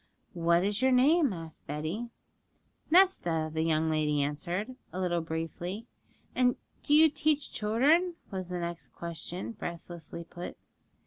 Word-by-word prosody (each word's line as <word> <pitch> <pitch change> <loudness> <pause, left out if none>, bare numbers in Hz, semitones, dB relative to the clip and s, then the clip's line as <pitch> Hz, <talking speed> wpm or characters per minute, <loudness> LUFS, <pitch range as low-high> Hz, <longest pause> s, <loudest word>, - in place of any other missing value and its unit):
'What 170 0 +3
is 205 +3 0
your 260 0 +4
name?' 280 +3 +5
asked 165 -3 -8
Betty. 155 +11 -3 0.8
'Nesta,' 175 - +4
the 160 - 0
young 160 0 +2
lady 150 -2 +2
answered, 175 - -3 0.2
a 185 - -5
little 175 -2 +1
briefly. 165 +6 -4 0.5
'And 250 -1 +3 0.3
do 290 - +3
you 320 +1 +8
teach 305 -1 0
children?' 290 +12 +3 0.2
was 185 -2 -4
the 180 - -3
next 170 -1 -5
question, 170 +3 -5
breathlessly 170 -4 -7
put. 175 +1 -8
180 Hz, 135 wpm, -30 LUFS, 165-250 Hz, 0.8 s, you